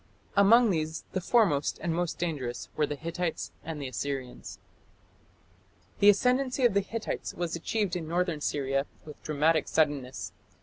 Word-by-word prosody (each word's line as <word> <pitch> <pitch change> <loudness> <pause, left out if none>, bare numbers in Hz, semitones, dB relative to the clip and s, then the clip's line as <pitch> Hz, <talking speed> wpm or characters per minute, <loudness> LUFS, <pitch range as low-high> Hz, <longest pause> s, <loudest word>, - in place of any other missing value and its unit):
Among 220 +3 +6
these 160 -2 -2
the 185 - -2
foremost 180 - +2
and 170 0 -1
most 175 0 -1
dangerous 140 -8 -3
were 150 -1 +1
the 145 - -3
Hittites 170 +3 -3
and 160 -2 -5
the 140 - -4
Assyrians. 130 -1 -5 1.4
The 205 - +7
ascendancy 255 +5 +3
of 235 - +4
the 200 - +4
Hittites 225 +3 -4
was 175 -1 -2
achieved 195 +2 -1
in 165 -3 -4
northern 170 -2 -1
Syria 135 -1 0 0.2
with 150 -1 -11
dramatic 155 +1 +2
suddenness. 145 -5 0
165 Hz, 145 wpm, -29 LUFS, 145-195 Hz, 1.4 s, The